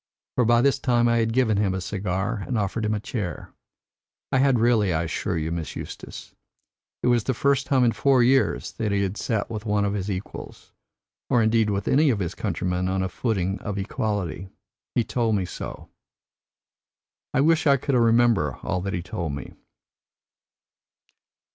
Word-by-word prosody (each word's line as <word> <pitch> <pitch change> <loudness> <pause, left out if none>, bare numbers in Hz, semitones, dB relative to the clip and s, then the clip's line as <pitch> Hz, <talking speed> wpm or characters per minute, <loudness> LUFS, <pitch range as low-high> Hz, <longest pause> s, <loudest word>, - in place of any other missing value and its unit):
For 125 - +2
by 120 +1 +4
this 140 -1 +3
time 120 -3 +2
I 115 0 +3
had 115 0 +1
given 115 -4 +2
him 100 -2 +1
a - - -2
cigar 95 +3 -2
and 125 - -1
offered 105 +2 -1
him 105 0 +1
a - - -2
chair. 100 -4 -5 0.8
I 135 - +3
had 135 -1 +4
really, 115 -4 +3
I 80 0 0
assure 85 +2 -2
you, 80 0 -2
Miss 85 -2 -4
Eustace. - - -8 0.7
It - - +2
was 120 -3 +2
the 130 - 0
first 140 +2 +1
time 130 -2 +3
in 120 - +4
four 130 0 +3
years 130 +2 +2
that 110 -2 -2
he 100 0 +1
had 95 0 -2
sat 110 -1 -2
with 110 -2 -4
one 105 0 +2
of 100 - -1
his 100 -1 -3
equals, 95 -1 -7 0.6
or 120 -2 +3
indeed 110 -1 +3
with 100 -1 -2
any 150 +2 +4
of 120 - +2
his 90 -2 -3
countrymen 90 -2 -2
on 95 0 0
a 95 - -2
footing 95 -2 -1
of 105 -2 -4
equality. 95 -3 -3 0.5
He 120 - +3
told 115 -2 0
me 95 -2 0
so. 90 - -7 1.4
I 135 - +2
wish 160 +2 +3
I 140 -1 +6
could 140 +2 -2
remember 115 - +3
all 90 0 -1
that 100 +1 -3
he 85 0 -2
told 85 -3 -4
me." 70 - -7
105 Hz, 185 wpm, -24 LUFS, 95-120 Hz, 1.4 s, I